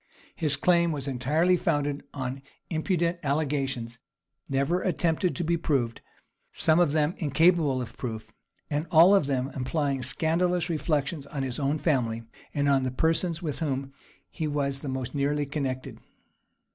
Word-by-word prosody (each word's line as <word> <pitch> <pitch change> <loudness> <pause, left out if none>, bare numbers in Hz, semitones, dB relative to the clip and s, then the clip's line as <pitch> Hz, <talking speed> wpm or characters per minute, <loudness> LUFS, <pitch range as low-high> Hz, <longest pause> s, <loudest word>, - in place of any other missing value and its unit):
His 150 -4 +2
claim 170 +3 +3
was 145 -3 -4
entirely 150 +8 +2
founded 145 -4 0
on 130 -1 -4 0.3
impudent 170 +1 0
allegations, 135 -5 -1 0.5
never 140 +7 +1
attempted 175 -1 0
to 175 - -2
be 170 +1 +1
proved; 130 -8 -1 0.5
some 160 +1 +3
of 170 -5 +3
them 155 +1 +2
incapable 155 -3 +3
of 115 -1 -10
proof, 110 -3 -5 0.4
and 150 +2 -2
all 170 +4 +7
of 195 -8 +4
their 135 -1 -1
implying 140 0 -1
scandalous 170 +6 0
reflections 150 -2 -1
on 140 -1 -4
his 130 0 -3
own 140 +2 +1
family, 120 -8 0 0.3
and 145 -1 0
on 140 -1 +4
the 130 - -1
persons 165 +5 0
with 150 -4 -3
whom 135 -3 -2 0.4
he 160 - -3
was 140 -2 -1
the 140 - -5
most 130 -2 -4
nearly 145 +1 0
connected. 135 -3 -4
145 Hz, 150 wpm, -27 LUFS, 135-165 Hz, 0.5 s, all